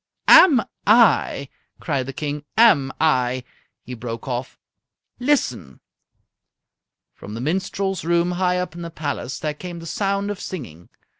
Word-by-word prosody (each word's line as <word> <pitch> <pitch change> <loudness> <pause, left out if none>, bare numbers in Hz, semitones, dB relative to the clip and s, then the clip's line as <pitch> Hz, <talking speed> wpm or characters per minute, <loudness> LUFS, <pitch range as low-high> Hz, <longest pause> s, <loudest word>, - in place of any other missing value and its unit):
"Am 280 -11 +8 0.2
I!" 215 - +4 0.3
cried 140 -6 -2
the - - -4
King. 145 +1 -4
"Am 175 -13 +5
I!" 130 -5 +1 0.4
He 125 - -8
broke 115 +1 -7
off. 125 0 -4 0.6
"Listen!" 185 - -1 1.3
From 105 - -10
the - - -5
minstrels' 185 +5 -2
room 170 +1 +1
high 180 0 0
up 180 -3 -3
in 170 - -9
the 170 - -6
palace 145 -5 -4
there 150 -1 -3
came 175 +3 -8
the 165 - -9
sound 200 +3 -1
of 205 - -6
singing. 90 - -8
160 Hz, 140 wpm, -22 LUFS, 130-190 Hz, 1.3 s, Am